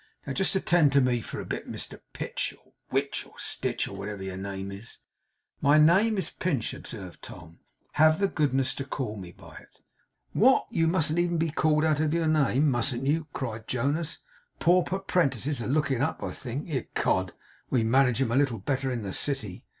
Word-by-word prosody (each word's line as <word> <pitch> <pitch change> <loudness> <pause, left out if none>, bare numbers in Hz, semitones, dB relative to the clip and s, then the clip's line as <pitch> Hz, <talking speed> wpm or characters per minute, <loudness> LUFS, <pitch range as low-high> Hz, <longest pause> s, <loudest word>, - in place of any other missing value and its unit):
Now 140 - -3
just 195 +6 0
attend 175 -6 +4
to 140 - +6
me 125 -2 +2
for - - -6
a - - -5
bit, - - -5
Mr - - -7
Pitch, - - -3
or - - -29 0.2
Witch, 140 +1 -1
or - - -20
Stitch, - - -2
or - - -8
whatever 100 -1 -5
your 95 -1 -5
name 95 0 -5
is.' 100 +4 -8 0.6
'My 145 +1 +5
name 190 +8 +5
is 185 -5 -2
Pinch,' 140 -11 -1
observed 95 -6 -9
Tom. 85 -1 -11 0.3
'Have 155 +1 +5
the 200 - +3
goodness 135 -7 +1
to 140 - -4
call 130 -5 -4
me 90 -4 -8
by - - -14
it.' - - -16 0.5
'What! 260 +6 +5
You 165 -7 +2
mustn't 165 -1 +1
even 175 -1 +1
be 165 -1 0
called 155 0 +2
out 155 -2 +2
of 155 +1 +1
your 170 -1 +1
name, 150 -2 +3
mustn't 120 +1 -1
you!' 155 +2 +1
cried 115 -6 -5
Jonas. 145 +6 -1 0.4
'Pauper' 180 +2 +3
prentices 145 - 0
are - - -3
looking 140 -2 +1
up, 150 +3 -1
I - - -3
think. 130 +3 -6
Ecod, 95 - 0 0.4
we 125 -4 +2
manage 125 +2 +3
'em 115 - -2
a - - +1
little 135 -4 +2
better 135 +6 -1
in 120 -3 -3
the 95 -2 -4
city! 130 -10 -3
140 Hz, 195 wpm, -28 LUFS, 115-160 Hz, 0.6 s, to